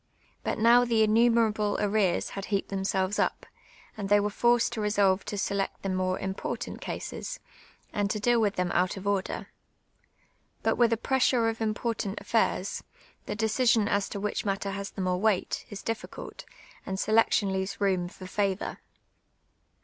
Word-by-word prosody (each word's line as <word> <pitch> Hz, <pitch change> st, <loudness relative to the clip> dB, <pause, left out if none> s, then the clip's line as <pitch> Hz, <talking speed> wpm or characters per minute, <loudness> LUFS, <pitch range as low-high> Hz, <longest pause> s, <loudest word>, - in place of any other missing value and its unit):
lUit -, -, -1 dB
now 235 Hz, +2 st, +6 dB
the 230 Hz, -2 st, +3 dB
innumerable 220 Hz, -1 st, +3 dB
arrears 205 Hz, -3 st, +1 dB
had 195 Hz, 0 st, -5 dB
heaped 200 Hz, -2 st, -1 dB
themselves 195 Hz, 0 st, -1 dB
up, -, -, 0 dB, 0.5 s
aiul 200 Hz, -, -2 dB
they 205 Hz, 0 st, +6 dB
were 205 Hz, +1 st, 0 dB
forced 240 Hz, +2 st, +2 dB
to 220 Hz, -, -3 dB
resolve 200 Hz, -2 st, +2 dB
to 205 Hz, -, -5 dB
select 200 Hz, 0 st, -2 dB
the 195 Hz, -, -1 dB
more 185 Hz, 0 st, 0 dB
imj)ortant 190 Hz, 0 st, -4 dB
casis, -, -, -5 dB, 0.6 s
and 205 Hz, -1 st, 0 dB
to 210 Hz, -, -1 dB
deal 240 Hz, +2 st, +3 dB
with 205 Hz, -2 st, +1 dB
them 180 Hz, -1 st, 0 dB
out 180 Hz, +2 st, +1 dB
of 190 Hz, -, -7 dB
ordir. 200 Hz, -1 st, -1 dB, 1.2 s
But -, -, +2 dB
with 235 Hz, -1 st, +3 dB
a 230 Hz, -, +2 dB
pressure 250 Hz, -1 st, +2 dB
of 225 Hz, 0 st, -5 dB
important 215 Hz, -2 st, -2 dB
aftairs, 215 Hz, -4 st, 0 dB, 0.5 s
the 210 Hz, -, -2 dB
decision 220 Hz, 0 st, +2 dB
as 200 Hz, -1 st, 0 dB
to 200 Hz, -, -5 dB
which 210 Hz, +1 st, -2 dB
matter 195 Hz, 0 st, -2 dB
has 200 Hz, 0 st, -4 dB
the -, -, -6 dB
more 180 Hz, -1 st, 0 dB
weight, 210 Hz, -2 st, 0 dB
is 205 Hz, -1 st, -8 dB
difficult, 225 Hz, -, -6 dB, 0.4 s
and 190 Hz, -1 st, -4 dB
selection 215 Hz, -2 st, +3 dB
leaves 190 Hz, +1 st, -3 dB
room 190 Hz, -3 st, +1 dB
for 185 Hz, +1 st, -11 dB
favour. 195 Hz, +1 st, -2 dB
205 Hz, 165 wpm, -28 LUFS, 195-225 Hz, 1.2 s, now